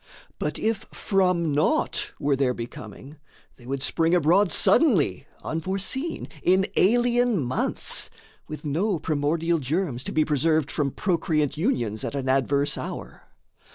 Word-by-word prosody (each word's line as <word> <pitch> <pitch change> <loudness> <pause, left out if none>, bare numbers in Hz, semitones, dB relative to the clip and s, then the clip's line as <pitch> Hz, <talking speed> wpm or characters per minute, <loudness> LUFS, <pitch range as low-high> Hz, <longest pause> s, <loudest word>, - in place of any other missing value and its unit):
But - - -2
if 220 -1 -2
from 180 -5 +1
naught 155 +3 0
Were 145 -1 +1
their 130 -2 0
becoming, 115 +5 -9 0.4
they 120 - -15
would 135 0 -3
spring 165 +3 +1
abroad 180 +4 +3
Suddenly, 195 - +3 0.2
unforeseen, 195 - -2
in 190 +2 +3
alien 240 +2 +3
months, 130 -2 0 0.4
With 155 +1 -8
no 175 +7 0
primordial 160 +2 0
germs, 140 -2 -2
to - - -4
be 155 - +2
preserved 155 0 +1
From 145 -2 0
procreant 160 -3 0
unions 120 - -1
at - - -4
an 135 -1 -2
adverse 140 +2 +1
hour. - - -8
160 Hz, 130 wpm, -25 LUFS, 140-190 Hz, 0.4 s, abroad